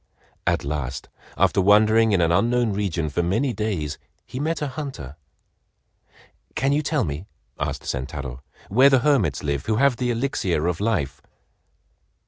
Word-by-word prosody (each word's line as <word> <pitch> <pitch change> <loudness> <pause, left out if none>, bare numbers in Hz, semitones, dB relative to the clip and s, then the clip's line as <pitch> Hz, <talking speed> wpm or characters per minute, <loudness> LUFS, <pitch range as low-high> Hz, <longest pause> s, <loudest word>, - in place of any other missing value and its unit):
At - - +1
last, 70 -3 -4 0.3
after - - +3
wandering 110 +3 +5
in 95 -3 +3
an 85 0 +2
unknown 120 +4 +2
region 95 -6 -1
for 75 +4 -1
many 110 +10 0
days, 95 -9 -3 0.3
he 130 - -7
met 160 +3 -1
a 150 - -2
hunter. 130 - -7 1.4
"Can 135 +2 +1
you 145 +2 +2
tell 150 -3 0
me," 75 +5 -5 0.3
asked - - -3
Sentaro, 65 -1 -5 0.3
"where 130 +7 +6
the 135 -3 +4
hermits 140 -9 +2
live 70 -2 -2
who 110 - +2
have 135 +1 +3
the 125 -1 -1
Elixir 115 - 0
of 85 -2 -1
Life?" 75 - -1
105 Hz, 150 wpm, -23 LUFS, 75-125 Hz, 1.4 s, where